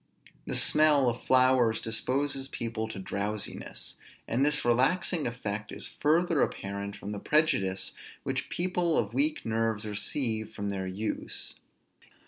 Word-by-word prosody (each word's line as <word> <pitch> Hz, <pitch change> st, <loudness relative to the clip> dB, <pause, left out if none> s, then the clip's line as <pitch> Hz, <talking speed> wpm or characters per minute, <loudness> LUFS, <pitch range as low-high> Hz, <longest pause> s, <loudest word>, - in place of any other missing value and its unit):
The -, -, -2 dB
smell 150 Hz, -3 st, +5 dB
of 120 Hz, -, -4 dB
flowers 130 Hz, -3 st, +4 dB
disposes 135 Hz, +4 st, 0 dB
people 115 Hz, -4 st, -3 dB
to 110 Hz, -, -7 dB
drowsiness; 100 Hz, +2 st, -4 dB, 0.3 s
and 125 Hz, +4 st, +1 dB
this 150 Hz, -2 st, +2 dB
relaxing 140 Hz, +7 st, +2 dB
effect 110 Hz, -3 st, -4 dB
is -, -, -3 dB
further 165 Hz, +1 st, +3 dB
apparent 100 Hz, 0 st, -2 dB
from 100 Hz, -, -6 dB
the 105 Hz, -, -4 dB
prejudice 135 Hz, -, +2 dB, 0.3 s
which -, -, -2 dB
people 175 Hz, -2 st, 0 dB
of 110 Hz, 0 st, 0 dB
weak 150 Hz, +4 st, +1 dB
nerves 115 Hz, -1 st, 0 dB
receive 110 Hz, +1 st, -2 dB
from 100 Hz, -1 st, -3 dB
their 95 Hz, -1 st, -3 dB
use. 100 Hz, +4 st, -3 dB
115 Hz, 130 wpm, -29 LUFS, 105-145 Hz, 0.3 s, smell